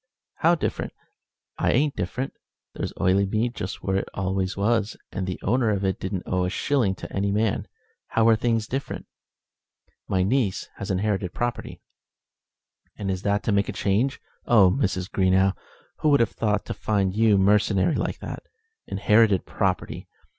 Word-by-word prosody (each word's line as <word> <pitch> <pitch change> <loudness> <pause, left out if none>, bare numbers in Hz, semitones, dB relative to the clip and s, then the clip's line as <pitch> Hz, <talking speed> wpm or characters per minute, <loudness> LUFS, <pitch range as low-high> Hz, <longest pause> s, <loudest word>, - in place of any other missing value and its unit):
"How 170 +2 +4
different? 160 - -3 0.7
I - - +2
ain't 145 +2 +2
different. 125 +9 -3 0.4
There's - - -4
Oileymead 100 +5 +1
just 95 -3 -6
where 95 0 0
it 95 - -3
always 95 0 -1
was, 110 +1 +1
and 95 -1 -3
the 90 - -4
owner 120 +2 +2
of 100 -2 0
it 95 - 0
don't 95 -1 -3
owe 90 -1 0
a - - 0
shilling 110 -1 +1
to - - -9
any 100 0 0
man. 105 0 0 0.4
How 115 0 +2
are 115 - +6
things 115 -1 0
different?" 135 +4 -4 1.0
"My 95 -1 +1
niece 105 -1 0
has 100 - -5
inherited 95 -1 -1
property." 120 -1 -3 1.2
"And 100 -2 -2
is 95 -1 -3
that 100 +1 0
to - - 0
make 100 0 +2
a - - -3
change? 110 +8 0 0.3
Oh! 100 -6 +6
Mrs. 95 -7 -1
Greenow, 95 0 +3 0.5
who 155 - +2
would 140 -1 +5
have 115 - +2
thought 105 -2 -1
to - - -4
find 100 -3 0
you 110 -2 +4
mercenary 105 - +3
like - - -2
that? - - -6 0.5
Inherited 105 0 +3
property! - - -2
100 Hz, 160 wpm, -25 LUFS, 95-115 Hz, 1.2 s, are